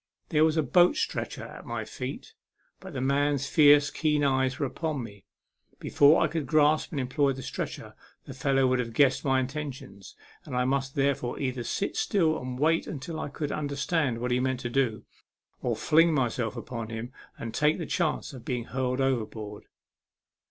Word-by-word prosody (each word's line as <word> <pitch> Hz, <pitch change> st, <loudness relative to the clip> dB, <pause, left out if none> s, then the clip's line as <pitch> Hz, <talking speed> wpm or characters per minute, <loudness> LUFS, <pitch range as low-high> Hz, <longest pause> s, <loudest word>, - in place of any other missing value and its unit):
There 155 Hz, -1 st, +3 dB
was 160 Hz, 0 st, +2 dB
a 160 Hz, -, +3 dB
boat 180 Hz, -, +4 dB
stretcher -, -, -3 dB
at -, -, -10 dB
my -, -, -4 dB
feet; -, -, -7 dB, 0.5 s
but 190 Hz, -3 st, -10 dB
the 130 Hz, -, -3 dB
man's 140 Hz, +1 st, +1 dB
fierce, 145 Hz, 0 st, +5 dB
keen 150 Hz, -2 st, +1 dB
eye 130 Hz, -1 st, +3 dB
was 130 Hz, -, -3 dB
upon 145 Hz, 0 st, -2 dB
me; 100 Hz, -3 st, -11 dB, 0.5 s
before 145 Hz, +2 st, +4 dB
I -, -, +3 dB
could 160 Hz, -3 st, -3 dB
grasp 155 Hz, 0 st, +3 dB
and 155 Hz, -7 st, -3 dB
employ 135 Hz, +2 st, +1 dB
the 130 Hz, 0 st, -8 dB
stretcher, -, -, -5 dB, 0.3 s
the -, -, -8 dB
fellow 135 Hz, +1 st, +1 dB
would 130 Hz, 0 st, +2 dB
have 115 Hz, -2 st, -3 dB
guessed 135 Hz, +1 st, +3 dB
my 135 Hz, -2 st, +2 dB
intentions, 130 Hz, -8 st, -6 dB, 0.3 s
and -, -, -7 dB
I 125 Hz, 0 st, +1 dB
must 135 Hz, 0 st, -1 dB
therefore 135 Hz, -3 st, 0 dB
either 130 Hz, -3 st, -2 dB
sit 195 Hz, -, -2 dB
still 160 Hz, -6 st, +1 dB
and 125 Hz, 0 st, -5 dB
wait 160 Hz, +4 st, +2 dB
until 155 Hz, +3 st, -5 dB
I 145 Hz, -, -4 dB
could 145 Hz, +1 st, -4 dB
understand 145 Hz, -2 st, -1 dB
what 125 Hz, +1 st, -3 dB
he 125 Hz, -, +2 dB
meant 130 Hz, 0 st, -1 dB
to 120 Hz, -, -4 dB
do, 125 Hz, -4 st, 0 dB, 0.6 s
or -, -, 0 dB
fling 165 Hz, +1 st, +4 dB
myself 120 Hz, -3 st, -1 dB
upon 115 Hz, -2 st, -6 dB
him 115 Hz, +2 st, -6 dB, 0.3 s
and 115 Hz, -1 st, -6 dB
take 150 Hz, +1 st, +2 dB
the 170 Hz, -, -4 dB
chance 165 Hz, -3 st, -1 dB
of 125 Hz, -3 st, -10 dB
being 120 Hz, -1 st, -2 dB
hurled 130 Hz, +1 st, -2 dB
overboard. 110 Hz, -5 st, -2 dB
135 Hz, 185 wpm, -28 LUFS, 125-150 Hz, 0.6 s, fierce